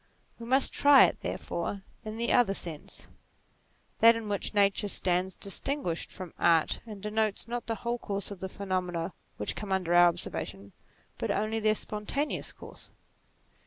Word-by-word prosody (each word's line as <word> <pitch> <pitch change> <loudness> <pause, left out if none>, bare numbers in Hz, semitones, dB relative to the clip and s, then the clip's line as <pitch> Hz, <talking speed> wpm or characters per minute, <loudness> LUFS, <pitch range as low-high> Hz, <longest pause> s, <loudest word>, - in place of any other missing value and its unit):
We 230 - -8
must 265 +2 +3
try 285 -1 +7
it - - -2
therefore 190 +3 -4 0.2
in 215 0 -6
the 235 +1 +1
other 225 -5 +4
sense, 160 -6 -6 0.9
that 230 0 +8
in 225 -1 -5
which 205 0 -2
Nature 200 0 +3
stands 185 -1 0
distinguished 200 - -2
from 185 -3 -9
Art, 165 -2 +3
and 210 -3 -9
denotes, 215 0 -1
not 240 -1 -4
the 225 - -1
whole 240 +1 0
course 200 -2 -3
of 200 - -7
the 190 - -4
pheno 190 -2 -2
mena 175 0 -4 0.2
which - - -2
come 205 -2 -6
under 185 -3 +1
our 175 0 +8
observation, 100 - -4 0.5
but - - -2
only 215 +2 0
their 215 0 +3
spontaneous 220 +9 -2
course. - - -13
200 Hz, 165 wpm, -29 LUFS, 180-225 Hz, 0.9 s, that